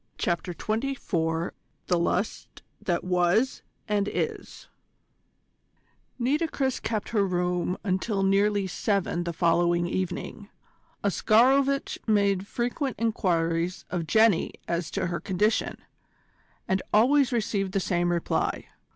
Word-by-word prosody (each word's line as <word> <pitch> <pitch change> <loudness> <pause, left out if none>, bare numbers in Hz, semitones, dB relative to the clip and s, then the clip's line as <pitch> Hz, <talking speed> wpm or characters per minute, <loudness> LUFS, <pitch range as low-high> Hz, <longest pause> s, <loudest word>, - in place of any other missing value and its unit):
CHAPTER 175 0 -1
XXIV 185 -9 -1 0.3
THE 175 -2 +1
LUST 180 +4 -2 0.2
THAT 175 -2 -1
WAS 180 +7 +2 0.3
AND 205 -2 +1
IS - - -4 1.5
Nitocris 270 +1 0
kept 215 -3 -2
her 210 -3 +2
room 180 -1 0
until 195 +1 0
nearly 200 +1 +2
seven 190 -2 -1
the 170 - -1
following 170 +1 +2
evening. 190 +3 -4 0.5
Oscarovitch 265 +7 +3
made 200 -2 +2
frequent 245 +4 -2
enquiries 175 -5 0
of 170 -3 -2
Jenny 220 -4 +3
as 170 -1 -2
to - - -2
her 170 -1 -2
condition, 200 +5 0 0.9
and 190 0 +1
always 265 +6 +4
received 205 -5 -1
the 195 - +2
same 175 -2 0
reply. 170 -1 -1
195 Hz, 110 wpm, -27 LUFS, 175-220 Hz, 1.5 s, always